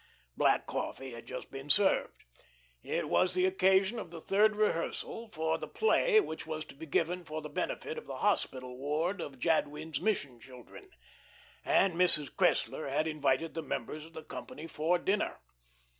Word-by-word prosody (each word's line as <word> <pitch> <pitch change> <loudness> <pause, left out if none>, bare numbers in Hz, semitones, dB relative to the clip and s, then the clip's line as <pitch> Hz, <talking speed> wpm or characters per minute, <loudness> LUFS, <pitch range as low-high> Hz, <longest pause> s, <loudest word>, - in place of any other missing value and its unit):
Black - - +3
coffee 135 -1 -4
had 115 -1 -10
just - - -7
been 135 +1 -8
served. 195 +6 +2 0.6
It - - -2
was 185 - +2
the 185 0 +3
occasion 190 +3 +3
of - - -7
the 170 0 -8
third 210 +5 +3
rehearsal 215 +3 -1
for 160 -3 -1
the - - -5
play 440 +1 +4
which 160 - -4
was 155 -1 -4
to - - -13
be 160 +3 -9
given 175 +4 0
for 155 -1 -5
the 150 0 -7
benefit 145 - -3
of - - -15
the - - -5
hospital 125 -1 -1
ward 160 +7 -1
for - - -4
Jadwin's 155 0 0
mission 145 - -1
children, 130 - -13 0.7
and 195 -2 +3
Mrs. 170 -4 +3
Cressler 175 -5 +1
had 150 +4 +1
invited 155 0 0
the 165 - -3
members 150 +1 -4
of 165 +1 -14
the 160 - -8
company 155 - -8
for 165 +2 +1
dinner. 195 +4 0
160 Hz, 170 wpm, -32 LUFS, 145-190 Hz, 0.7 s, play